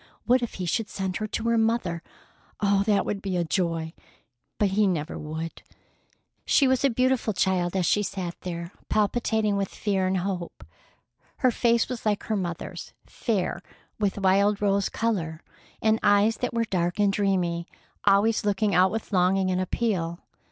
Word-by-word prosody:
What 250 +1 +4
if 240 - -4
he 185 - -4
should 215 +6 -1
send 190 -2 -3
her 215 - -3
to 220 - -3
her 230 -1 +3
mother! 220 -7 0 0.6
Oh, 200 -1 +3
that 205 -2 +3
would 200 - -3
be 185 -3 -1
joy!—but 165 - -3
he 205 +2 +2
never 165 -4 -2
would. 160 +2 -6 0.8
She 275 - +4
was 260 +1 +2
a 275 - +5
beautiful 255 -2 +1
child 185 -1 +1
as 185 -2 +1
she 205 - +3
sat 185 -4 -3
there 170 -1 -5 0.2
palpitating 215 -1 +1
with 195 -1 0
fear 195 -3 -1
and 190 0 +1
hope. 180 -2 -4 0.7
Her 255 -3 +3
face 235 0 +2
was 250 -1 -5
like 210 -2 0
her 220 - -1
mother's, 175 -4 -5
fair, 195 -5 -2 0.4
with 205 -2 0
wild 200 +1 +3
rose 200 -1 +1
color, 175 -9 -2 0.4
and 220 0 +3
eyes 205 +2 +4
that 250 - -2
were 230 -1 0
dark 175 -4 -1
and 200 -1 +3
dreamy, 180 -4 0 0.4
always 205 +3 +3
looking 205 0 +1
out 185 +1 +5
with 220 +1 -5
longing 185 +1 +3
and 185 0 0
appeal. 185 -4 -1
200 Hz, 165 wpm, -26 LUFS, 180-220 Hz, 0.8 s, a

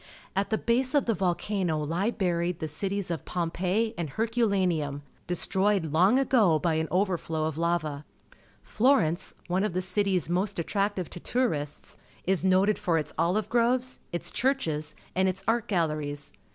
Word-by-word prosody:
At 195 +1 0
the 220 - +1
base 255 +5 +1
of 285 - +3
the 230 - +2
volcano 180 -3 -1 0.2
he 210 - +2
buried 175 -5 -1
the 155 - -4
cities 195 +4 -3
of 165 - -3
Eaaipeii 185 +6 -1
and 165 -3 -2
Hxxcu 230 - +1
lancutTi^ 165 -8 0 0.3
destroyed 190 -1 +1
long 185 +9 +5
ago 230 - +4
bj' 160 -2 +1
an 160 - -2
overflow 175 -4 0
oThxva. 155 -2 -1 0.6
Florencej^ 215 - +2
one 185 +2 0
of 210 - -1
the 185 - 0
cities 190 -3 0
most 185 +4 -1
attractive 195 +1 -1
"tD 175 - -8
tT5urists, 155 - -2 0.3
is 190 -1 +1
noted 190 +2 +3
for 170 -2 +1
its 155 - -3
olive 185 +5 +1
groves, 245 +2 +1
its 175 - -2
churches, 160 - -1 0.2
and 190 +1 +2
its 190 +1 -3
art 225 0 +1
galleries. 155 -6 -1
185 Hz, 155 wpm, -28 LUFS, 165-210 Hz, 0.6 s, long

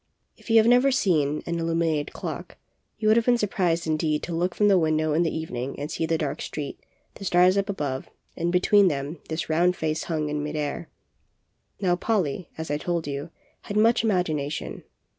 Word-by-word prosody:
If - - -16
you 225 - +5
have 220 - +6
never 245 +3 +5
seen 155 - +1
an 170 0 -2
illuminated 165 -2 0
clock, - - -6 0.4
you 215 - -1
would 215 +1 +6
have 230 - +2
been 245 -1 +5
surprised 180 -6 0
indeed 155 -1 0
to 175 - -4
look 175 +2 -1
from 210 - +3
the 195 -3 +5
window 155 -1 +1
in 160 - +2
the 170 - +2
evening 140 -5 -4
and 145 +2 -4
see 160 - -1
the 165 0 +1
dark 145 -3 -3
street, 145 -2 -5 0.3
the - - -11
stars 180 0 +4
up 200 0 0
above, 145 -9 -3 0.3
and 170 +1 -1
between 190 +2 +5
them 145 0 -2
this 160 +1 -3
round 175 +3 +2
face 155 -1 -2
hung 155 -3 -1
in 150 0 -2
mid 150 +1 -4
air. 150 +2 -3 0.9
Now 180 -3 +2
Polly, 180 -6 -1
as 160 -2 -4
I 145 - 0
told 170 0 -2
you, 140 +2 -4 0.4
had 205 - -3
much 225 +2 +4
imag 190 -6 +2
ination. 145 - -4
165 Hz, 200 wpm, -25 LUFS, 150-185 Hz, 0.9 s, have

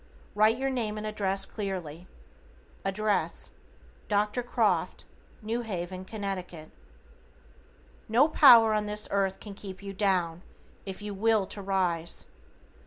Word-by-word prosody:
Write 215 +2 +4
your 270 +1 -1
name 220 -5 -2
and 210 - -5
address 195 -2 +1
clearly. 180 -5 -6 0.8
Address: 205 +2 -1 0.6
Dr. 210 +3 +1
Croft, 220 -7 0 0.4
New 230 +3 -2
Haven, 185 -4 -5
Conn. 185 -6 -5 1.4
No 245 +7 +5
power 235 -8 +7
on 210 -1 0
this 210 0 +1
earth 195 -1 0
can 205 - -9
keep 195 -1 -9
you 195 0 -6
down, 180 -4 0 0.5
if 195 +1 -6
you 210 -1 -5
WILL 215 0 +2
to 200 - -6
rise. 180 -4 -1
200 Hz, 120 wpm, -28 LUFS, 190-215 Hz, 1.4 s, power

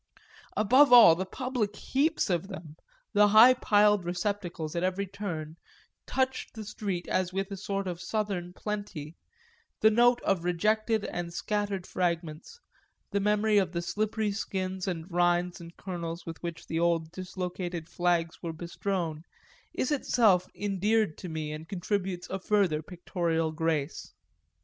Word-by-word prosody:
Above 255 +7 +5
all 235 -9 +10
the 185 +3 -3
public 245 -3 -2
heaps 285 -3 0
of 175 +1 0
them, 165 -6 -9 0.4
the 210 0 +6
high 220 +5 +8
piled 210 -4 +3
receptacles 175 -3 -3
at 170 - 0
every 185 +2 0
turn, 175 -6 -5 0.5
touched 260 -1 -1
the 220 -1 -7
street 195 -4 -4
as 185 -1 0
with 195 +1 -3
a - - -3
sort 195 0 -3
of 175 -1 -4
southern 195 -3 -2
plenty; 185 -6 -5 0.6
the 220 - +5
note 240 +2 +4
of 195 -2 +2
the 170 - -10
rejected 215 +5 +1
and 175 -1 -4
scattered 200 0 -2
fragments, 170 - -3 0.5
the 200 - +1
memory 210 +1 +3
of 185 -3 0
the 170 - -1
slippery 210 +4 -1
skins 190 -2 -3
and 165 -3 -3
rinds 175 0 +1
and 170 0 -12
kernels 170 -3 -5
with 165 -1 -7
which 170 -1 -6
the 160 - -2
old 165 -2 +1
dislocated 180 -2 -5
flags 175 -2 0
were 165 -1 -4
bestrown, 170 -1 -3 0.5
is 260 - -2
itself 220 -10 +3
endeared 205 -1 +1
to 180 - -8
me 155 -1 -4
and 155 +1 -8
contributes 190 -1 -2
a 190 - -2
further 190 -6 +1
pictorial 165 -1 -2
grace. 155 - -2
185 Hz, 150 wpm, -29 LUFS, 170-210 Hz, 0.6 s, all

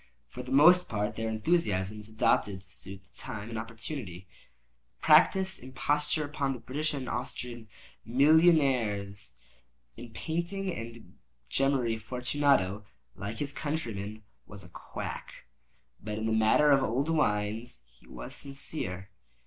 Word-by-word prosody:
For 125 - -7
the 125 +1 -9
most 175 +6 +7
part 105 +1 -1
their 115 0 -2
enthusiasm 110 - 0
is 105 +1 -6
adopted 105 -2 +1
to 95 - -16
suit 95 0 -9
the 100 +1 -28
time 105 +1 -6
and 115 - -4
opportunity—to 110 - -6 0.7
practise 190 +4 +5
imposture 150 +4 -1
upon 145 -2 -1
the 125 - -7
British 145 +6 -2
and 130 -3 -5
Austrian 120 -2 -5 0.4
millionaires. 125 - +3 0.6
In 120 +1 -9
painting 170 - -3
and 115 0 -9 0.3
gemmary, 130 -5 +1
Fortunato, 125 -4 +1 0.3
like 100 +4 -5
his 145 -1 -3
countrymen, 115 -8 -4 0.2
was 100 -2 -9
a 90 - -13
quack—but 95 - -9
in 110 - -2
the 110 - +1
matter 110 +7 +5
of 135 -1 +6
old 130 +5 0
wines 105 - 0
he - - -23
was - - -8
sincere. 100 - -4
115 Hz, 130 wpm, -30 LUFS, 105-145 Hz, 0.7 s, most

